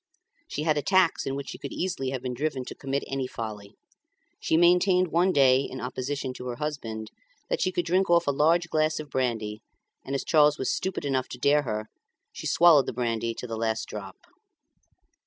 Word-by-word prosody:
She 150 - -4
had 155 -2 +2
attacks 185 +2 +2
in 135 - -2
which 140 -1 -5
she - - -8
could 140 - -6
easily 165 -8 -2
have 130 -2 -4
been 125 -1 -3
driven 135 0 -2
to - - -7
commit 135 0 -3
any 135 -1 -3
folly. 105 -4 -7 0.6
She 160 - +1
maintained 180 +1 +4
one 175 +4 +3
day, 130 -4 +5
in 130 -1 -6
opposition 130 +2 -4
to 125 - -8
her 120 - -3
husband, 115 -7 -5 0.4
that - - 0
she 185 - +1
could 175 -2 -1
drink 185 +2 +1
off 170 0 +4
a 140 - +2
large 165 +4 +3
glass 155 0 +1
of 150 -2 -8
brandy, 110 -5 -2 0.4
and, 135 - -4
as 135 - -3
Charles 150 -1 +4
was 130 - -1
stupid 190 -5 -3
enough 130 -2 -1
to - - -7
dare 145 +4 +3
her 110 -5 -3
to, 110 - -27 0.3
she - - -5
swallowed 165 -5 +5
the - - -3
brandy 115 -1 -2
to - - -6
the 115 -2 -4
last 110 0 -1
drop. 100 -3 -7
140 Hz, 205 wpm, -27 LUFS, 125-160 Hz, 0.6 s, day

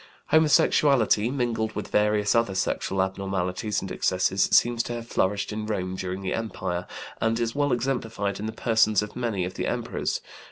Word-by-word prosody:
Homosexuality, 140 -7 +4
mingled 120 -4 -1
with 105 - -4
various 105 0 +2
other 115 -5 +1
sexual 95 0 0
abnormalities 95 +1 -2
and 95 - -6
excesses, 95 +1 +1
seems 120 -1 +3
to 120 - -4
have 120 -1 -5
flourished 100 -2 -1
in 105 0 -4
Rome 95 -3 -2
during 95 +1 -4
the 95 - -1
empire, 90 -6 -3 0.3
and 115 +1 +1
is 115 -1 -1
well 145 -1 +1
exemplified 115 -6 -1
in 105 - -3
the - - -3
persons 110 -2 +2
of 105 - -8
many 115 -7 -1
of 90 - -5
the - - -3
emperors. - - -2
105 Hz, 170 wpm, -26 LUFS, 95-115 Hz, 0.3 s, Homosexuality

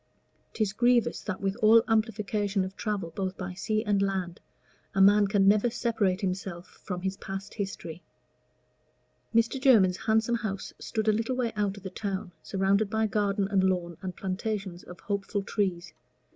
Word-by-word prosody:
'Tis 210 -3 0
grievous 240 +1 +2
that 200 -3 -5
with 195 0 0
all 225 +1 +6
amplification 210 -3 0
of 190 +1 -8
travel 195 -7 -3
both 190 -1 -3
by 185 -1 -5
sea 215 +3 -1
and 205 -3 +1
land, 190 -3 -2 0.6
a - - +1
man 205 +1 +6
can 195 -1 +3
never 210 +4 +4
separate 220 -5 0
himself 185 -2 -3 0.2
from 180 -2 -5
his 190 0 -2
past 195 0 -6
history. 180 -5 -5 1.3
Mr. 230 +3 +2
Jermyn's 205 -10 +5
handsome 220 +2 +1
house 200 -3 -4
stood 220 -1 -3
a 215 - +5
little 225 +4 -1
way 245 -2 -1
out 205 -1 -1
of 200 - -11
the 190 - -6
town, 190 -2 -4
surrounded 195 +3 +1
by 220 +1 +1
garden 200 -1 0
and 195 -2 +3
lawn 180 -2 0
and 185 -2 -5
plantations 195 -1 -3
of 180 - -11
hopeful 200 0 -2
trees. 180 -5 -2
200 Hz, 165 wpm, -28 LUFS, 190-220 Hz, 1.3 s, all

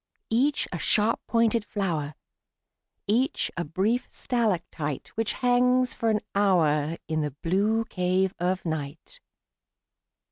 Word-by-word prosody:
Each 270 +6 +2
a 175 - -4
sharp 215 +6 +2
pointed 230 -1 +2
flower, 165 -9 -2 0.9
Each 245 +8 +1
a 170 - -1
brief 195 +10 0
stalactite 175 - -2
Which 225 -1 -2
hangs 250 0 +2
for 230 - 0
an 215 -1 +1
hour 165 -6 +2
In 155 -1 0
the 150 -3 -3
blue 210 +6 +1
cave 185 0 0
of 180 +1 -1
night. 155 -2 -5
195 Hz, 115 wpm, -26 LUFS, 165-230 Hz, 0.9 s, Each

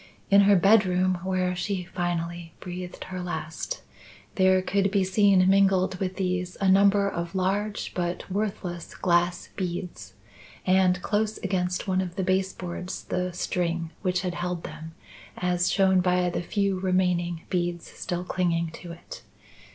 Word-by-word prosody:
In 200 0 +8
her 200 0 +6
bedroom, 185 -2 +4
where 185 -1 0
she 185 +1 -2
finally 170 -1 -3
breathed 180 0 -7
her 185 -1 -6
last, 170 -2 -5 0.5
there 185 -1 +4
could 195 +1 +1
be 195 -1 +2
seen 190 -1 +4
mingled 190 -1 +3
with 185 -1 -2
these 180 -1 -2
a 195 - +1
number 200 +1 +5
of 170 -1 -4
large 200 +3 -1
but 175 -1 -3
worthless 190 -4 -3
glass 175 -1 +1
beads; 175 - -5 0.5
and 185 -1 +4
close 215 +1 0
against 180 -1 -1
one 185 0 +2
of 180 -2 -5
the 190 - -1
base 190 +1 +1
boards, 180 0 -6
the 180 0 -2
string 170 -2 -2
which 180 -2 0
had 180 -2 -2
held 175 0 -3
them, 160 +1 -8 0.4
as 180 0 +1
shown 190 -1 +4
by 180 0 +2
the - - -2
few 195 +1 0
remaining 180 -2 0
beads 175 -1 -1
still 175 0 -4
clinging 170 -2 0
to 170 +1 -9
it. - - -11
180 Hz, 150 wpm, -26 LUFS, 175-190 Hz, 0.5 s, In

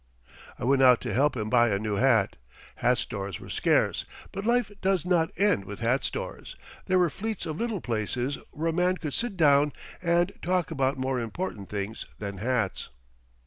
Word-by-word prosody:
I - - -7
went 135 +2 +3
out 125 -2 +7
to 120 -4 -3
help 140 +3 +2
him 105 -1 -2
buy 120 +1 +4
a 100 - +1
new 105 0 -2
hat. 115 -4 +3 0.4
Hat 125 0 +3
stores 100 -7 -4
were - - -9
scarce, - - +2 0.3
but 195 +3 -4
life 240 -3 +2
does 190 -3 +1
not 175 -3 +2
end 195 - +3
with 105 +3 -8
hat 125 +4 +1
stores; - - -5 0.3
there 185 - +3
were 175 -3 +3
fleets 220 +3 -4
of 155 0 -4
little 230 -6 -2
places 120 +4 -2
where 165 +2 -2
a - - -1
man 180 +2 +2
could 150 -5 -5
sit 230 -5 -2
down 145 -2 +4 0.3
and 175 +1 +2
talk 180 -1 0
about 135 -2 0
more 130 0 -1
important 115 - -4
things 100 +2 -4
than 100 -2 -5
hats. 115 -2 -1
135 Hz, 185 wpm, -27 LUFS, 115-180 Hz, 0.4 s, out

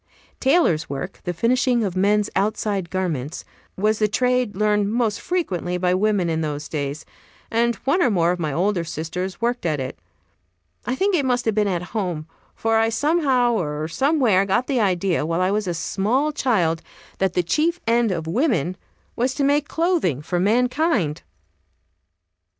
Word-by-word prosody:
Tailor's 265 - +2
work 140 +7 -5
the 180 - -1
finishing 240 +5 +2
of 190 -3 -2
men's 205 +2 +2
outside 200 -2 -1
garments 165 -6 -3 0.3
was 215 +2 +1
the 215 - +3
trade 250 0 +1
learned 210 0 +1
most 225 -2 0
frequently 180 - -2
by 180 0 +1
women 200 -1 +1
in 160 -1 -1
those 150 -1 -3
days, 145 0 -4 0.5
and 235 +1 +2
one 335 +7 +2
or 275 - +4
more 175 -5 +2
of 180 - -2
my 155 -3 -1
older 180 +4 0
sisters 170 +3 -4
worked 240 +1 0
at 155 -4 0
it; 130 0 -5 0.9
I 250 - 0
think 395 +7 +1
it 320 -6 +2
must 250 -2 0
have 220 - +2
been 210 0 +1
at 180 -3 -1
home, 175 -8 -2 0.3
for 225 0 +1
I 225 0 +3
somehow 265 -2 +2
or 155 -6 -2
somewhere 250 - +2
got 200 +6 +1
the 265 -2 0
idea, 185 -5 +1
while 165 +2 -1
I 185 +1 +2
was 210 -1 -1
a 175 - 0
small 235 - 0
child, 185 - +1 0.4
that 190 -2 +1
the 180 - +2
chief 320 - +1
end 230 -1 +2
of 165 -3 -3
woman 185 - 0 0.4
was 255 +2 0
to 285 - 0
make 285 +1 +2
clothing 325 - 0
for 175 +3 -1
mankind. 240 - +1
205 Hz, 170 wpm, -22 LUFS, 175-245 Hz, 0.9 s, or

